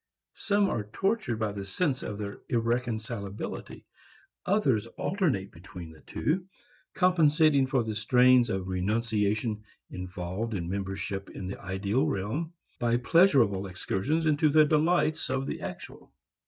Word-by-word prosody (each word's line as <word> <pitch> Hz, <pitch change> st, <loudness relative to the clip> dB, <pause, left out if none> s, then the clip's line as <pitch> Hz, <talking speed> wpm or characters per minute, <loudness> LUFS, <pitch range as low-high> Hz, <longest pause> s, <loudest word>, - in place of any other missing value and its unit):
Some 205 Hz, -1 st, +1 dB
are 105 Hz, -, -2 dB
tortured 195 Hz, -, 0 dB
by 110 Hz, -1 st, -1 dB
the 100 Hz, -1 st, -5 dB
sense 130 Hz, -, -1 dB
of 100 Hz, -, -5 dB
their 100 Hz, -1 st, -6 dB
irreconcilability. 115 Hz, -3 st, -3 dB, 0.6 s
Others 135 Hz, -, +2 dB
alternate 155 Hz, -, 0 dB
between 85 Hz, -1 st, -10 dB
the 80 Hz, -, -16 dB
two, 180 Hz, +4 st, -2 dB, 0.5 s
compensating 155 Hz, -6 st, +4 dB
for 130 Hz, -2 st, +1 dB
the 110 Hz, -1 st, -3 dB
strains 125 Hz, +3 st, +4 dB
of 95 Hz, -3 st, -2 dB
renunciation 105 Hz, +2 st, 0 dB, 0.3 s
involved 90 Hz, +4 st, -4 dB
in 85 Hz, -3 st, -3 dB
membership 95 Hz, +1 st, -4 dB
in 95 Hz, -, -7 dB
the 95 Hz, -, -6 dB
ideal 100 Hz, +6 st, 0 dB
realm 120 Hz, -, -2 dB, 0.3 s
by 120 Hz, 0 st, +2 dB
pleasurable 125 Hz, -, +4 dB
excursions 95 Hz, -, -1 dB
into 155 Hz, 0 st, +3 dB
the 155 Hz, +1 st, +6 dB
delights 155 Hz, +1 st, +2 dB
of 130 Hz, +1 st, -1 dB
the -, -, -4 dB
actual. -, -, -8 dB
115 Hz, 130 wpm, -28 LUFS, 100-150 Hz, 0.6 s, the